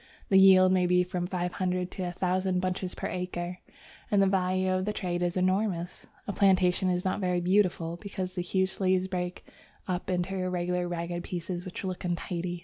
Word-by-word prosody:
The 190 - +6
yield 185 -1 +7
may 185 -1 +3
be 180 0 +4
from 180 0 -3
five 180 -1 -2
hundred 180 -1 -1
to - - -6
a - - -3
thousand 185 +1 0
bunches 185 0 -2
per - - -5
acre, 180 0 -4 0.5
and 205 - +3
the 195 - +5
value 185 -1 +1
of 185 0 0
the 210 - -1
trade 175 -3 -2
is 175 +1 0
enormous. 185 -1 -1 0.2
A 200 - -2
plantation 185 -2 +3
is 180 +1 -1
not 185 - 0
very 180 -1 +1
beautiful, 175 -2 +1
because 185 -1 -5
the 180 - -2
huge 190 +1 -1
leaves 185 -1 +2
break 180 -1 -4 0.4
up 180 0 -3
into 180 +1 -1
irregular, 180 -1 -1
ragged 175 0 -3
pieces 175 0 -4
which 185 - -6
look 185 -1 -4
untidy. 175 0 -3
180 Hz, 190 wpm, -29 LUFS, 180-185 Hz, 0.5 s, yield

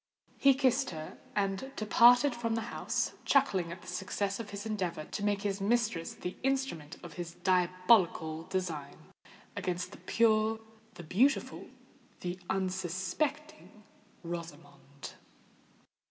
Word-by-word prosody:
He 275 -1 +6
kissed 265 0 +2
her, 155 -2 -8 0.2
and 200 +5 -1
departed 245 +5 +6
from 230 -1 -1
the 230 +1 -3
house, - - -1
chuckling 195 -12 +2
at 170 +1 -9
the - - -14
success 195 +2 -2
of 220 -3 -6
his 200 +1 -6
endeavour 185 -7 -2
to 205 - -5
make 205 -1 +1
his 200 -1 -1
mistress 215 -5 0
the 180 - -5
instrument 265 - -1
of 175 - -9
his 170 0 -7
diabolical 180 -3 +2
design 165 -7 -3 0.6
against 180 0 -2
the - - -12
pure—the 220 -2 0
beautiful—the 185 - -2
unsuspecting 195 - -2 0.4
Rosamond. 150 -4 -8
195 Hz, 115 wpm, -31 LUFS, 175-230 Hz, 0.6 s, He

